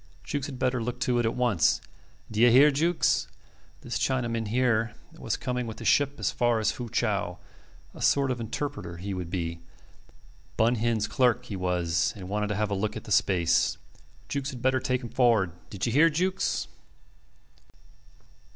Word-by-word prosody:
Jukes 140 - -3
had 135 -3 -7
better 125 -1 0
look 120 +1 -4
to 120 -1 +1
it 120 - +2
at 115 - -2
once. 120 -9 +2 0.5
"D'ye 115 +3 +5
hear, 135 +5 +7
Jukes?" 150 - +1 0.5
This - - -3
chinaman 115 -4 -1
here 115 -1 +1 0.2
was - - -3
coming 125 -1 -3
with 110 - -7
the - - -8
ship 140 -1 +3
as - - 0
far 120 -2 +1
as 110 - +1
Fu 120 -2 -6
chau 100 -7 -1 0.6
a - - -11
sort 140 -2 +3
of 120 -2 -3
interpreter 115 -7 -4
he 95 +3 -5
would 90 -2 -5
be. 85 -2 -3 1.0
Bun 115 +2 +4
Hin's 110 -1 0
clerk 125 0 +2
he 105 - -6
was, 90 -3 0
and 95 -3 -8
wanted 105 +1 -1
to 105 - -2
have 105 0 -1
a - - +1
look 100 +2 -2
at - - -8
the - - -10
space. 85 -3 +2 0.5
Jukes 140 -1 -3
had 130 -3 -7
better 130 0 +3
take 125 0 -1
him 120 - -6
forward. 115 -7 +3 0.2
"D'ye 105 +3 -2
hear, 155 +5 +6
Jukes?" 185 +4 -1
115 Hz, 175 wpm, -27 LUFS, 100-130 Hz, 1.0 s, hear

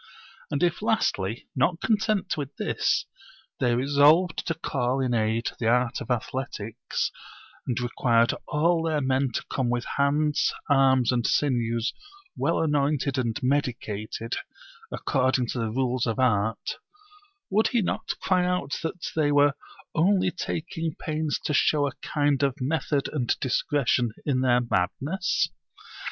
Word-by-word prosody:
And 145 +4 -1
if 175 +1 +1
lastly, 120 - 0
not 165 +6 +2
content 215 -2 +1
with 140 -3 -5
this, - - 0 0.5
they 120 -2 +2
resolved 145 +7 +3
to 165 - 0
call 130 -4 -1
in 130 -2 0
aid 110 0 0
the 115 - 0
art 125 +1 +2
of - - -7
athletics, 120 -2 -3 0.6
and 120 - -1
required 120 -1 +2
all 165 +3 +2
their 160 -2 0
men 130 -1 +1
to - - -1
come 130 -3 0
with 120 0 -1
hands, 145 +1 +2 0.2
arms, 130 -3 +4
and 120 -2 +1
sinews 120 -4 +1 0.4
well 165 - +1
anointed 145 -2 +1
and 120 0 -1
medicated 120 -5 -2 0.5
according 130 -1 +1
to 125 - -2
the 115 -1 -1
rules 125 +1 0
of 115 - -1
art, 110 -4 0 0.7
would 215 +3 +3
he 240 -4 +1
not - - -3
cry 185 -1 +3
out 180 -5 -1
that 165 +1 -4
they 150 -2 +2
were 145 0 +5 0.4
only 185 +2 +3
taking 165 -2 -4
pains 155 -1 -1
to 150 - -1
show 145 0 +3
a 140 - -4
kind 145 -2 +1
of 140 -3 0
method 145 +1 0
and 125 -6 0
discretion 125 -2 +1
in 130 -3 +1
their 125 -1 +3
madness? 145 - 0
135 Hz, 140 wpm, -26 LUFS, 120-155 Hz, 0.7 s, were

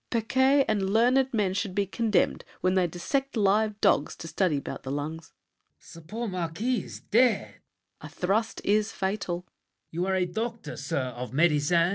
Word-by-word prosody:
Pequet 260 +4 +3
And 200 -3 0
learned 250 +5 +3
men 205 -6 +1
should 195 -1 -2
be 200 -1 +2
condemned 215 0 +1 0.2
when 185 0 +2
they 185 -2 +3
Dissect 260 - -2
live 210 +1 +2
dogs 145 - +3
to 165 - -8
study 165 -4 +1
'bout - - -7
the 130 - -7
lungs. 150 +3 -4 0.5
LAFFEMAS. - - -17
The 165 - -11
poor 220 +9 -5
marquis 185 +5 -1
is - - -10
dead. 235 -1 +4
SAVERNY. 105 -3 -15 0.4
A 155 - -8
thrust 195 +8 -1
is 215 +2 +2
fatal. 190 -3 -2
LAFFEMAS. 180 - -44
You 175 +3 -1
are 190 - +1
a 185 -1 +2
doctor, 225 +5 -4
sir, 150 -5 -2
of 125 +1 -6
medicine? 165 +2 +3
195 Hz, 180 wpm, -27 LUFS, 170-225 Hz, 0.5 s, dead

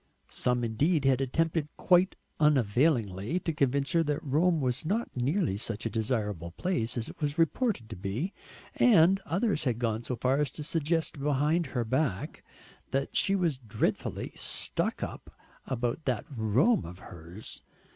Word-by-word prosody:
Some 125 -1 0
indeed 140 +7 +1
had 135 -1 +3
attempted 160 +3 0
quite 180 +1 +3 0.2
unavailingly 125 - +2
to 165 - -2
convince 140 -1 +1
her 170 -1 +3
that 150 -2 -1
Rome 160 +4 +2
was 130 0 -1
not 210 +9 -2
nearly 135 - 0
such 110 +1 -1
a 115 - -1
desirable 105 -7 -1
place 120 - -2
as 115 - -2
it - - -11
was 145 0 -1
reported 165 - +1
to 110 - -7
be, 105 - -3 0.4
and 195 -5 +6
others 185 0 0
had 120 -4 +1
gone 115 -2 -1
so 125 +1 -3
far 130 +3 +1
as 150 -2 +1
to 150 - -6
suggest 160 0 -1
behind 150 +4 +1
her 125 -2 -2
back 130 -4 -1 0.5
that 135 +1 -2
she 195 +1 +4
was 170 -8 0
dreadfully 110 -3 -2
"stuck - - -1
up" - - -7 0.4
about 125 +4 -2
"that 125 -5 -1
Rome 125 - +3
of 90 +2 -9
hers." 90 +3 -9
135 Hz, 155 wpm, -29 LUFS, 115-165 Hz, 0.5 s, and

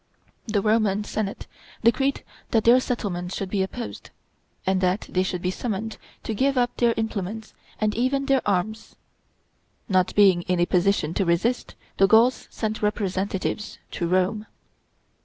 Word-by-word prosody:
The 210 -3 0
Roman 215 -2 +2
Senate 210 -1 -4 0.4
decreed 270 +4 +2 0.3
that 225 -2 +2
their 240 +2 +6
settlement 190 -8 -3
should 195 -2 -4
be 200 - +1
opposed, 230 +5 -5 0.6
and 190 0 +1
that 185 +3 +1
they 185 - 0
should 185 -1 -2
be 180 - +1
summoned 220 +1 -4 0.3
to 225 - -3
give 270 +5 +1
up 245 -1 +1
their 235 -1 +3
implements 220 -1 -4 0.3
and 215 -1 +1
even 265 +4 0
their 270 -2 +3
arms. 210 +3 -2 0.9
Not 185 -1 +1
being 195 -4 +5
in 180 -1 +1
a 175 - +4
position 180 -3 +1
to 195 - 0
resist, 185 +9 0 0.2
the 195 - +5
Gauls 230 +5 +4
sent 220 -1 -3
representatives 200 0 -2
to 170 - -2
Rome. 185 +5 +1
210 Hz, 150 wpm, -24 LUFS, 185-225 Hz, 0.9 s, their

